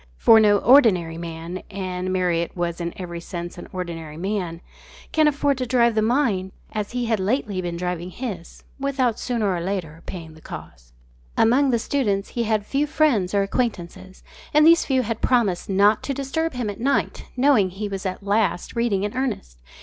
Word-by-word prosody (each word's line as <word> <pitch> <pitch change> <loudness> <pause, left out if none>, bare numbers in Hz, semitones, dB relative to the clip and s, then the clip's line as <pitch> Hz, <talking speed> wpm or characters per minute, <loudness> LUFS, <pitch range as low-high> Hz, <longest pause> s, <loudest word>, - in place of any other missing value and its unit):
For 225 - +7
no 205 -1 +5
ordinary 195 - +4
man 170 +2 -6
and 185 -2 -4
Marriott 175 -2 0
was 175 0 -2
in 170 0 -2
every 175 -2 -6
sense 175 0 -7
an - - -9
ordinary 165 -4 -6
man 180 -2 -3 0.5
can 310 -1 +4
afford 285 -2 +1
to 255 - -2
drive 235 -1 +3
the 215 - +1
mind 215 -6 +1 0.2
as 210 +1 -4
he 245 -1 -1
had 225 -2 0
lately 205 -1 -1
been 175 -1 -4
driving 180 0 -3
his, 190 -5 -7 0.2
without 265 -4 0
sooner 225 -6 0
or 175 - -2
later 170 -4 -4
paying 165 -3 -7
the 160 - -16
cost. - - -11 0.4
Among 265 +5 +4
the 240 - +3
students 215 -5 -1
he 235 -1 -2
had 215 -2 0
few 280 +6 0
friends 255 -12 +2
or 200 - +3
acquaintances, 190 -4 -3 0.3
and 300 0 +7
these 335 +1 +6
few 260 -2 +1
had 225 0 -4
promised 215 -9 +1
not 200 +2 +4
to 275 - -3
disturb 280 +4 -2
him 240 -4 -2
at 200 - -11
night, 275 +4 0
knowing 250 -8 +4
he 200 +3 -5
was 195 -1 -5
at 190 0 -4
last 200 -3 0
reading 230 -5 +1
in 205 +2 -3
earnest. 225 - -3
200 Hz, 185 wpm, -23 LUFS, 180-245 Hz, 0.5 s, For